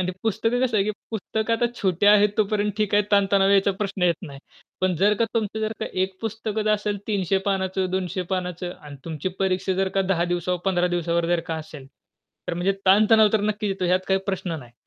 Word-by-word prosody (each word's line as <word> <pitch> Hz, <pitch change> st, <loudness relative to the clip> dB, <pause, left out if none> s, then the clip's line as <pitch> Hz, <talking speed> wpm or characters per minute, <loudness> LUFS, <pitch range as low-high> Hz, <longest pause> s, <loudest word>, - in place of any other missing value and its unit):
आणि 180 Hz, -, -1 dB
ते 185 Hz, -, -1 dB
पुस्तक 225 Hz, +3 st, 0 dB
कसं 240 Hz, -4 st, +1 dB
आहे, 195 Hz, -, +2 dB
की 215 Hz, -, 0 dB, 0.2 s
पुस्तक 220 Hz, +1 st, -3 dB
आता 230 Hz, +1 st, +2 dB, 0.2 s
छोट्या 195 Hz, +2 st, +4 dB
आहेत 210 Hz, 0 st, +5 dB
तोपर्यंत 210 Hz, 0 st, +1 dB
ठीक 210 Hz, -1 st, +1 dB
आहे, 205 Hz, -, +5 dB
ताणतणाव 195 Hz, -1 st, +4 dB
याचा 200 Hz, 0 st, +4 dB
प्रश्न 200 Hz, -2 st, -3 dB
येत 175 Hz, -1 st, +2 dB
नाही. 140 Hz, -6 st, -9 dB, 0.4 s
पण 185 Hz, -1 st, +1 dB
जर 205 Hz, +5 st, +3 dB
का -, -, +5 dB
तुमचं 220 Hz, -1 st, -1 dB
जर 215 Hz, 0 st, -1 dB
का -, -, -2 dB, 0.2 s
एक 190 Hz, 0 st, -2 dB
पुस्तकच 220 Hz, -1 st, -3 dB
असेल 205 Hz, -1 st, -2 dB
300 195 Hz, -2 st, +1 dB
पानाचं, 190 Hz, -1 st, -1 dB
200 185 Hz, 0 st, -2 dB
पानाचं 180 Hz, -1 st, -4 dB
आणि 145 Hz, -2 st, -10 dB
तुमची 160 Hz, +2 st, -3 dB
परीक्षा 190 Hz, 0 st, 0 dB
जर 190 Hz, +1 st, 0 dB
का 195 Hz, -, +4 dB
10 170 Hz, -1 st, +1 dB
दिवसावर, 180 Hz, +1 st, -2 dB
15 180 Hz, -2 st, +2 dB
दिवसावर 170 Hz, -1 st, 0 dB
जर 175 Hz, -1 st, +1 dB
का 165 Hz, -, -1 dB
असेल, 150 Hz, -3 st, -9 dB, 0.6 s
तर 170 Hz, -, -1 dB
म्हणजे 180 Hz, +3 st, +1 dB
ताणतणाव 215 Hz, +3 st, +6 dB
तर 220 Hz, -, +3 dB
नक्कीच 210 Hz, 0 st, -1 dB
येतो 190 Hz, -1 st, -3 dB
ह्यात 180 Hz, +1 st, +2 dB
काही 190 Hz, 0 st, +2 dB
प्रश्न 185 Hz, -4 st, -3 dB
नाही. 120 Hz, -4 st, -14 dB
195 Hz, 215 wpm, -24 LUFS, 180-210 Hz, 0.6 s, ताणतणाव